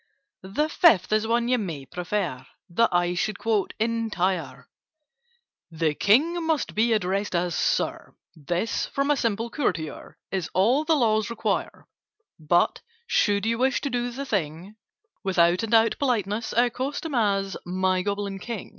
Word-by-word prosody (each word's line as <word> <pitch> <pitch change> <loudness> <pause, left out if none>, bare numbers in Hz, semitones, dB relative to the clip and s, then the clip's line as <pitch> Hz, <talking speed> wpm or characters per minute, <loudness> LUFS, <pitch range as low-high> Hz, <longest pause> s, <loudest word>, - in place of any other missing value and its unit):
"The 300 +1 +2
Fifth 260 - +4
is 215 +1 +2
one 235 +1 +1
you 250 0 +2
may 165 -10 -5
prefer 175 -4 -3 0.3
That 230 +6 +3
I 175 0 +1
should 205 +4 -1
quote 215 -4 -1
entire:— 220 -5 -1 1.0
The 160 -2 0
King 310 - +3
must 320 -4 -1
be 230 +2 +2
addressed 200 -2 0
as 175 0 0
'Sir.' - - -1 0.2
This, 175 +8 -2
from 275 +1 0
a - - +4
simple 230 -2 -1
courtier, 160 - -3
Is 185 -5 -2
all 240 +11 +3
the 320 0 +3
Laws 220 -5 +2
require: 230 -1 -2 0.5
"But, 165 +3 +2 0.2
should 205 - +1
you 230 +1 0
wish 265 +1 +2
to 280 - -3
do 245 0 -1
the 270 +3 -6
thing 185 - -3 0.5
With 190 -1 -2
out 170 +1 +4
and 225 -1 -4
out 225 0 +3
politeness, 225 -5 -1
Accost 255 +5 0
him 320 - -4
as 200 -5 +1
'My 185 +1 0
Goblin 200 0 -3
King! 225 0 -6
210 Hz, 155 wpm, -25 LUFS, 180-240 Hz, 1.0 s, Fifth